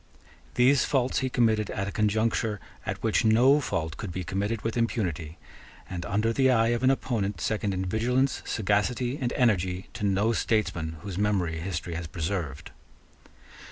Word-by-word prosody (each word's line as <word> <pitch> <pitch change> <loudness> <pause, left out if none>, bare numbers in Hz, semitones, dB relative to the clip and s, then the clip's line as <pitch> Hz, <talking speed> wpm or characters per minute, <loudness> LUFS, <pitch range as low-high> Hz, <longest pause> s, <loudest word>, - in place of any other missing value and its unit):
These 130 +2 +5
faults 130 -2 +1
he 130 - -1
committed 110 -4 +2
at 100 0 -3
a - - -3
conjuncture 105 0 0 0.3
at - - -4
which - - +2
no 120 +6 +5
fault 80 - -3
could 100 - -5
be 90 +1 -4
committed 105 +4 -2
with 115 - -2
impunity, 90 - -2 0.5
and 90 -1 -5
under 105 +3 +1
the 130 +2 +3
eye 115 -2 +4
of 120 0 0
an 130 - +4
opponent 105 -8 -1
second 105 +4 -1
in 95 0 -2
vigilance, 125 +7 +1
sagacity, 120 +5 0
and 125 -2 0
energy, 95 -7 +1
to 120 -3 -6
no 100 +3 +2
statesman 85 -9 -1
whose 100 -2 -5
memory 95 -6 0
history 85 -1 -4
has 85 0 -4
preserved. 80 -4 -4
105 Hz, 160 wpm, -27 LUFS, 90-120 Hz, 0.5 s, These